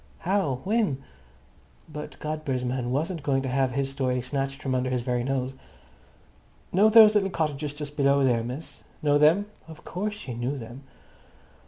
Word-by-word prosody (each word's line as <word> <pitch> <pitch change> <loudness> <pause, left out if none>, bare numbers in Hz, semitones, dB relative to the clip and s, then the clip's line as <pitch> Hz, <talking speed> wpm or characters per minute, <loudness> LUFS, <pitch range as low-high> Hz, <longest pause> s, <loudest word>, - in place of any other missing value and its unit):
How? 160 -8 0
When?" 200 - 0 0.8
But 150 0 -8
Godber's 150 -5 -3
man 125 -1 -2
wasn't 160 +6 -1
going 135 -2 0
to 130 - -2
have 130 -1 +1
his 135 0 -1
story 130 -2 0
snatched 135 +2 -3
from 135 -2 -2
under 130 0 0
his 125 -2 -1
very 125 -1 -1
nose. 130 0 -1 1.2
"Know 205 +4 +5
those 215 -1 +8
little 200 -2 +2
cottages 150 -4 -2
just 145 0 -7
below 140 -1 +3
here, 120 -3 +2
miss?" 125 +7 -7 0.2
Know 145 -1 +4
them? 165 +7 +5 0.2
Of 160 -2 -12
course, 205 +4 -3
she 130 -11 -6
knew 120 +4 -2
them. 120 +2 -9
140 Hz, 165 wpm, -26 LUFS, 130-155 Hz, 1.2 s, those